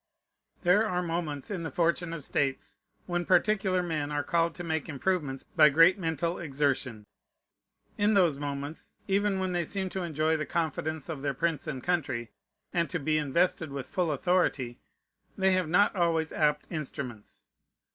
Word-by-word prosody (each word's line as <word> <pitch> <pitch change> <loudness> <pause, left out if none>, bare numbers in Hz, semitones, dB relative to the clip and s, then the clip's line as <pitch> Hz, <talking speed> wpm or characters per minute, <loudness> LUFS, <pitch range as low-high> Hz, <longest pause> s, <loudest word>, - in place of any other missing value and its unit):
There 185 +4 +5
are 180 0 0
moments 165 -3 -3
in 190 -4 -3
the 165 - -3
fortune 170 +3 0
of 165 -3 -5
states, 135 0 -1 0.3
when 175 -1 -1
particular 190 0 +2
men 155 -4 -2
are 145 0 -1
called 170 +1 +1
to 175 - -6
make 160 -2 -2
improvements 145 -3 -1
by 150 - +5
great 165 +7 +5
mental 165 0 -1
exertion. 135 -7 -1 0.9
In 205 +1 +3
those 175 -7 +4
moments, 145 +1 -5 0.2
even 200 0 +1
when 190 -1 -1
they 175 -1 0
seem 190 +3 -2
to 190 - -3
enjoy 160 -1 0
the 155 - -2
confidence 160 -2 -2
of 155 -4 -5
their 140 -1 -1
prince 165 +3 -1
and 135 -5 -4
country, 135 -10 -1 0.4
and 170 -1 +1
to 175 - -1
be 155 0 +1
invested 160 +2 +1
with 135 -2 -5
full 175 +1 -1
authority, 145 -6 0 0.6
they 190 0 +3
have 185 -3 +1
not 205 +5 +4
always 165 -3 +1
apt 150 -1 +1
instruments. 130 - -6
165 Hz, 165 wpm, -29 LUFS, 145-180 Hz, 0.9 s, There